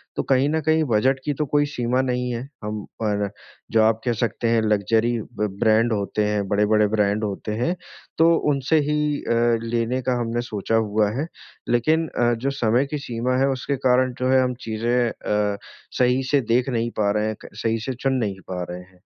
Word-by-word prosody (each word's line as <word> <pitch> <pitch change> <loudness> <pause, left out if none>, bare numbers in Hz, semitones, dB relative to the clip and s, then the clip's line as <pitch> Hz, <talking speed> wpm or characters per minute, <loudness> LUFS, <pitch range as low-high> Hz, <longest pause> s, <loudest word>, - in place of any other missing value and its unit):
तो - - -1
कहीं 135 +2 +3
न 160 +1 +1
कहीं 155 +1 +2
बज़ट 130 +4 +2
की 145 - 0
तो 150 +2 -2
कोई 145 0 +4
सीमा 125 -3 0
नहीं 125 -1 -1
है 120 -1 -3 0.2
हम 105 -1 -4 0.2
पर, 105 -2 0 0.4
जो 110 - +4
आप 110 0 +2
कह 120 - +2
सकते 115 0 -1
हैं 115 -1 +3
लग्ज़री 110 +2 +2 0.3
ब 105 - +1
ब्रांड 110 +1 +3
होते 105 +1 -1
हैं, 105 -1 -1
बड़े-बड़े 105 +1 +3
ब्रांड 105 0 +1
होते 105 +1 -3
हैं 170 +7 +1 0.4
तो 165 +1 +5 0.2
उनसे 140 +3 +2
ही 150 - +1 0.3
अ, - - 0 0.4
लेने 120 +2 0
का 125 0 0
हमने 120 0 -1
सोचा 105 +1 -1
हुआ 105 -1 +2
है। 155 - -2 0.4
लेकिन 155 +7 +2
अ, 120 -4 +1
जो 125 +4 -2
समय 120 +5 +3
की 150 - -1
सीमा 120 +2 -1
है 135 - +3
उसके 135 +2 -2
कारण 125 0 +3
जो 130 0 0
है 130 0 +5
हम 125 0 0
चीज़ें 120 +2 +1
अ, 105 -2 -1 0.4
सही 125 +1 +3
से 145 -2 +4
देख 125 +2 +2
नहीं 120 -1 -1
पा 100 -1 +2
रहे 105 +1 0
हैं, 110 - -2
त - - -10
सही 115 0 +1
से - - -1
चुन 135 -1 +1
नहीं 95 -2 -4
पा 90 -1 -3
रहे 90 +1 -6
हैं। 90 0 -20
115 Hz, 205 wpm, -23 LUFS, 105-130 Hz, 0.4 s, तो